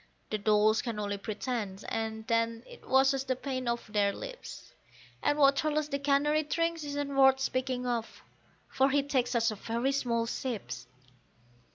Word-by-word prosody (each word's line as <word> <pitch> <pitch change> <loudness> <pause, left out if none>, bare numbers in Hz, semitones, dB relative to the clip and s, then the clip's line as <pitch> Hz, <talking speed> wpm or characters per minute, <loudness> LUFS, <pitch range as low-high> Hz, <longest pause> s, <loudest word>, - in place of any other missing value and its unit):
The 215 - -1
dolls 215 +1 +3
can 235 -3 -4
only 205 -1 -2
pretend, 210 -2 -4
and 220 0 -3
then 230 0 0
it - - -14
washes 270 0 +4
the 260 -1 -1
paint 255 -1 -3
off 235 0 -2
their 205 -1 +1
lips, - - -9 0.5
And 290 - +1
what 275 -1 +5
Charles 305 -1 0
the 280 - -2
canary 290 +2 +2
drinks 330 +1 -1
isn't 285 -1 -3
worth 265 -1 +6
speaking 255 -1 -1
of, 235 -2 -3 0.4
for 270 +1 +2
he 280 +1 +2
takes 265 -3 0
such 230 -1 +2
very 230 +5 -1
small 235 -4 0
sips. 190 - -4
255 Hz, 160 wpm, -30 LUFS, 225-280 Hz, 0.5 s, worth